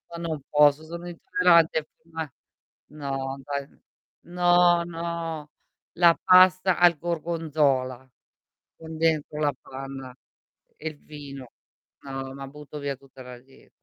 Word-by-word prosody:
No, 170 Hz, -, -6 dB
non 155 Hz, -3 st, -3 dB
posso, 150 Hz, +1 st, +4 dB
sono 170 Hz, +2 st, -8 dB
intollerante 170 Hz, -2 st, +3 dB
prima 160 Hz, -2 st, -7 dB, 0.6 s
no, 135 Hz, -2 st, -4 dB
dai 140 Hz, +1 st, -4 dB, 0.6 s
no, 175 Hz, 0 st, +4 dB
no, 165 Hz, -2 st, -5 dB, 0.4 s
la 170 Hz, -1 st, +5 dB
pasta 185 Hz, 0 st, +6 dB
al 175 Hz, -2 st, +5 dB
gorgonzola 150 Hz, -6 st, -1 dB, 0.7 s
con 160 Hz, 0 st, -9 dB
dentro 155 Hz, -2 st, 0 dB
la 145 Hz, -1 st, +2 dB
panna 135 Hz, -1 st, -8 dB, 0.6 s
e 160 Hz, -, -6 dB
il 155 Hz, -, -13 dB
vino, 140 Hz, -4 st, -10 dB, 0.5 s
no, 135 Hz, -1 st, -6 dB
ma 135 Hz, 0 st, -8 dB
butto 150 Hz, +1 st, -10 dB
via 140 Hz, -1 st, -3 dB
tutta 135 Hz, 0 st, -16 dB
la 125 Hz, -1 st, -10 dB
die 135 Hz, +2 st, -22 dB
150 Hz, 120 wpm, -26 LUFS, 135-170 Hz, 0.7 s, pasta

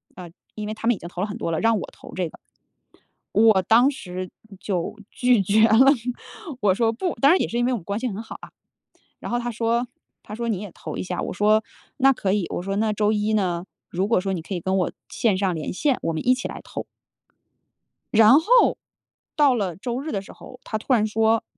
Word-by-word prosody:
呃， 175 Hz, -2 st, -10 dB, 0.2 s
因 210 Hz, -1 st, -5 dB
为 215 Hz, -, -3 dB
他 225 Hz, +1 st, -5 dB
们 240 Hz, -, +4 dB
已 -, -, -12 dB
经 170 Hz, -, -8 dB
投 180 Hz, -, -6 dB
了 205 Hz, -, 0 dB
很 205 Hz, -, -6 dB
多 165 Hz, -, -3 dB
了， 160 Hz, -, 0 dB
让 225 Hz, -1 st, +3 dB
我 -, -, -6 dB
投 -, -, -14 dB
这 180 Hz, -2 st, -1 dB
个。 -, -, -16 dB, 0.9 s
我 215 Hz, -3 st, +5 dB
当 235 Hz, +8 st, +5 dB
时 185 Hz, -8 st, -7 dB, 0.3 s
就 185 Hz, 0 st, -3 dB
拒 250 Hz, -4 st, +3 dB
绝 215 Hz, +4 st, +4 dB
了， 235 Hz, +5 st, +6 dB, 0.7 s
我 195 Hz, -3 st, +4 dB
说： 225 Hz, +2 st, +1 dB
“不。” 350 Hz, +9 st, -2 dB
当 280 Hz, -, +5 dB
然 370 Hz, -, +4 dB
也 -, -, 0 dB
是 235 Hz, -, -3 dB
因 240 Hz, -, +2 dB
为 255 Hz, -, +1 dB
我 -, -, 0 dB
们 175 Hz, -, -10 dB
关 200 Hz, +4 st, -3 dB
系 255 Hz, -, -2 dB
很 210 Hz, 0 st, -4 dB
好 -, -, -9 dB
啊， -, -, -11 dB, 0.7 s
然 -, -, -6 dB
后 240 Hz, -, 0 dB
他 240 Hz, 0 st, -3 dB
说 235 Hz, +2 st, 0 dB, 0.4 s
他 210 Hz, -, -8 dB
说： 235 Hz, +1 st, -3 dB
“你 205 Hz, -, -1 dB
也 205 Hz, -4 st, -8 dB
投 -, -, -7 dB
一 -, -, -3 dB
下。” 180 Hz, -1 st, -3 dB
我 -, -, -4 dB
说： 215 Hz, +2 st, +3 dB, 0.4 s
“那 270 Hz, 0 st, +5 dB
可 195 Hz, -6 st, -1 dB
以，” 200 Hz, -4 st, 0 dB
我 -, -, -3 dB
说， 195 Hz, +1 st, -3 dB
“那 215 Hz, 0 st, +1 dB
周 210 Hz, 0 st, +1 dB
一 210 Hz, +1 st, 0 dB
呢， 180 Hz, -4 st, 0 dB, 0.3 s
如 190 Hz, +3 st, -1 dB
果 230 Hz, -6 st, +3 dB
说 195 Hz, 0 st, -2 dB
你 170 Hz, -4 st, -3 dB
可 190 Hz, -, -6 dB
以 175 Hz, -, -3 dB
跟 190 Hz, +3 st, 0 dB
我 180 Hz, -, 0 dB, 0.2 s
线 210 Hz, -5 st, +1 dB
上 190 Hz, -2 st, 0 dB
连 155 Hz, -, -4 dB
线， 275 Hz, +7 st, +1 dB
我 165 Hz, -, -1 dB
们 160 Hz, -, -4 dB
一 255 Hz, -, +6 dB
起 255 Hz, -, -5 dB
来 -, -, -8 dB
投。” -, -, -6 dB, 1.3 s
然 225 Hz, +6 st, +7 dB
后， 480 Hz, +8 st, +4 dB, 0.6 s
到 290 Hz, -4 st, +5 dB
了 195 Hz, -8 st, -2 dB
周 240 Hz, +6 st, -4 dB
日 310 Hz, +3 st, -5 dB
的 200 Hz, -3 st, -2 dB
时 -, -, -13 dB
候， 250 Hz, -, -13 dB
他 215 Hz, -, -3 dB
突 255 Hz, +4 st, -1 dB
然 215 Hz, -3 st, +3 dB
说， 220 Hz, +1 st, +2 dB
215 Hz, 260 characters per minute, -23 LUFS, 190-240 Hz, 1.3 s, 然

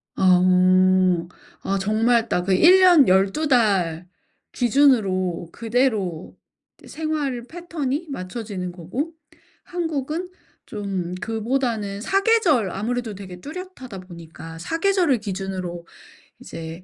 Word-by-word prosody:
아. 185 Hz, -1 st, +4 dB, 1.2 s
아 195 Hz, -, -1 dB
정말 225 Hz, +3 st, +1 dB
딱 180 Hz, -, 0 dB
그 195 Hz, -, +2 dB
1 355 Hz, -, +6 dB
년 350 Hz, -7 st, +6 dB
12 195 Hz, +12 st, +2 dB
달 190 Hz, -, +1 dB, 0.5 s
기준으로 205 Hz, -, +2 dB
그대로 220 Hz, -8 st, -1 dB, 0.5 s
생활 300 Hz, -5 st, -3 dB
패턴이 325 Hz, 0 st, -4 dB
맞춰지는 190 Hz, -4 st, -5 dB
거고 190 Hz, -, -5 dB, 0.5 s
한국은 325 Hz, 0 st, -3 dB, 0.4 s
좀 190 Hz, -4 st, -4 dB
그보다는 225 Hz, -3 st, -2 dB
4 390 Hz, -, +1 dB
계절 335 Hz, -, +3 dB
아무래도 230 Hz, +2 st, -3 dB
되게 185 Hz, -2 st, -10 dB
뚜렷하다 295 Hz, -, -8 dB
보니까 165 Hz, -2 st, -11 dB
4 250 Hz, -, -3 dB
계절을 355 Hz, -, +2 dB
기준으로 190 Hz, -4 st, -5 dB, 0.5 s
이제 165 Hz, +2 st, -8 dB
225 Hz, 205 characters per minute, -22 LUFS, 185-285 Hz, 1.2 s, 1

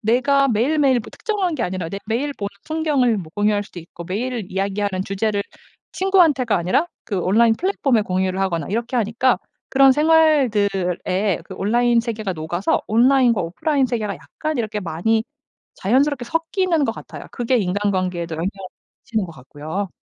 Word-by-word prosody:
내가 265 Hz, +5 st, +3 dB
매일매일 260 Hz, +3 st, +2 dB
뭐 -, -, -11 dB
특정한 390 Hz, -6 st, -2 dB
게 245 Hz, -, -2 dB
아니라 180 Hz, -3 st, -3 dB
내 200 Hz, -, -4 dB
매일 255 Hz, +6 st, -1 dB
보는 200 Hz, -7 st, -4 dB, 0.2 s
풍경을 290 Hz, -8 st, +1 dB
뭐 160 Hz, -4 st, -8 dB
공유할 205 Hz, 0 st, +1 dB
수도 180 Hz, -, -11 dB
있고 170 Hz, +1 st, -11 dB
매일 225 Hz, +3 st, -3 dB
이야기하는 195 Hz, 0 st, -1 dB
주제를 200 Hz, +1 st, -1 dB, 0.5 s
친구한테가 330 Hz, -, +3 dB
아니라 185 Hz, -, +1 dB, 0.2 s
그 200 Hz, -4 st, -2 dB
온라인 225 Hz, +6 st, +4 dB
플랫폼에 280 Hz, -, +1 dB
공유를 185 Hz, 0 st, -1 dB
하거나 170 Hz, -6 st, -1 dB
이렇게 235 Hz, +3 st, -2 dB
하니까 235 Hz, +3 st, +2 dB, 0.3 s
그런 270 Hz, 0 st, +6 dB
생활들에 210 Hz, -, +2 dB
그 -, -, -9 dB
온라인 235 Hz, +3 st, +2 dB
세계가 220 Hz, -4 st, -3 dB
녹아서 175 Hz, +3 st, -1 dB
온라인과 240 Hz, 0 st, +4 dB
오프라인 265 Hz, -, 0 dB
세계가 215 Hz, -5 st, -2 dB
약간 310 Hz, -3 st, -5 dB
이렇게 215 Hz, -2 st, -2 dB
많이 195 Hz, +6 st, 0 dB, 0.5 s
자연스럽게 260 Hz, +5 st, +1 dB
섞이는 330 Hz, +2 st, 0 dB
것 225 Hz, -, 0 dB
같아요. -, -, -10 dB
그게 245 Hz, +1 st, 0 dB
인간관계에도 185 Hz, -4 st, -1 dB
영향을 170 Hz, +4 st, -1 dB, 0.5 s
미치는 215 Hz, -5 st, -1 dB
것 165 Hz, -, -10 dB
같고요. 155 Hz, +8 st, -6 dB
220 Hz, 395 characters per minute, -21 LUFS, 190-265 Hz, 0.5 s, 그런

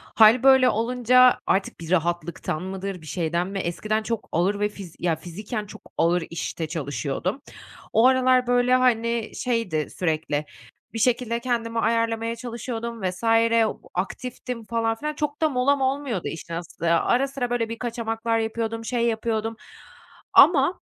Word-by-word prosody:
Hâl 225 Hz, +3 st, +6 dB
böyle 265 Hz, -1 st, +6 dB
olunca 250 Hz, +2 st, +4 dB
artık 195 Hz, -2 st, 0 dB
bir 165 Hz, 0 st, -7 dB
rahatlıktan 170 Hz, -1 st, -1 dB
mıdır, 190 Hz, -1 st, -5 dB
bir 155 Hz, -, -13 dB
şeyden 170 Hz, +3 st, -1 dB
mi? 195 Hz, 0 st, -4 dB
Eskiden 215 Hz, +5 st, -2 dB
çok 230 Hz, 0 st, -4 dB
ağır 190 Hz, +5 st, +1 dB
ve 210 Hz, 0 st, +1 dB
fiz 195 Hz, -5 st, -11 dB
ya 170 Hz, -2 st, +1 dB
fiziken 205 Hz, +7 st, -6 dB
çok 205 Hz, -, -12 dB, 0.2 s
ağır 170 Hz, +1 st, +2 dB
işte 165 Hz, -1 st, -4 dB
çalışıyordum. 150 Hz, -, -3 dB, 0.5 s
O 225 Hz, -, +5 dB
aralar, 255 Hz, -1 st, +3 dB
böyle, 245 Hz, +1 st, +3 dB
hani, 235 Hz, -2 st, +1 dB
şeydi 230 Hz, -11 st, -1 dB
sürekli 155 Hz, -3 st, -1 dB, 0.5 s
bir 225 Hz, -, -4 dB
şekilde 235 Hz, 0 st, +1 dB
kendimi 230 Hz, -2 st, -2 dB
ayarlamaya 230 Hz, +1 st, 0 dB
çalışıyordum 235 Hz, -1 st, -5 dB
vs. 185 Hz, +2 st, -3 dB, 0.7 s
aktiftim 240 Hz, +5 st, -4 dB
falan 225 Hz, 0 st, 0 dB
filan. 300 Hz, +6 st, -4 dB
Çok 295 Hz, 0 st, -3 dB
da 315 Hz, -, +3 dB
molam 270 Hz, +1 st, +2 dB
olmuyordu 265 Hz, -7 st, -1 dB
işin 165 Hz, +1 st, -6 dB
aslı. 170 Hz, 0 st, -3 dB
Ara 245 Hz, +10 st, +2 dB
sıra, 270 Hz, -3 st, -3 dB
böyle, 240 Hz, -2 st, -1 dB
bir 230 Hz, -, -6 dB
kaçamaklar 230 Hz, -1 st, -2 dB
yapıyordum, 225 Hz, 0 st, -3 dB
şey 235 Hz, 0 st, 0 dB
yapıyordum. 225 Hz, -1 st, -1 dB, 0.8 s
Ama, 315 Hz, +1 st, +6 dB
225 Hz, 145 wpm, -24 LUFS, 180-245 Hz, 0.8 s, Hâl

